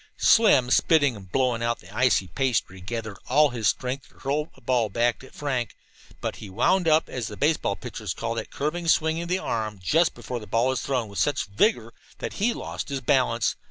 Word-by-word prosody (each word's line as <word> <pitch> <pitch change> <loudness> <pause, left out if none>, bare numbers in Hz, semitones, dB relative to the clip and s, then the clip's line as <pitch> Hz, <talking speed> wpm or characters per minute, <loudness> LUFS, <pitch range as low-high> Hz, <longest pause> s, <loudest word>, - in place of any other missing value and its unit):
Slim, 135 - +5
spitting 145 -6 +4
and 95 -3 -12
blowing 125 -1 +1
out 115 0 0
the 95 +3 -14
icy 125 -7 +3
pastry, 115 -6 -1
gathered 110 0 -5
all 150 +3 +5
his 120 -4 -1
strength 130 +4 -2
to - - -26
hurl 150 +3 -2
a - - -19
ball 120 -2 +1
back 120 +4 0
at 130 - -13
Frank. 130 -6 -2 0.5
But - - -3
he 105 - -9
"wound 165 - +2
up," 155 0 +4
as 125 -4 -4
baseball 145 -7 +1
pitchers - - -6
call - - -3
that - - -5
curving 165 +4 -3
swinging 160 0 +2
of 170 - -6
the 180 - +2
arm 110 - -3
just 160 - +2
before 125 -1 -5
the 105 - -11
ball 115 +6 +2
is 130 - -2
thrown, 125 -5 -1
with 100 -1 -6
such 145 -2 +1
vigor 115 - +1 0.2
that - - -5
he 235 +4 +3
lost 230 - -5
his 135 -1 -3
balance. 125 -4 +2
125 Hz, 205 wpm, -25 LUFS, 110-150 Hz, 0.5 s, Slim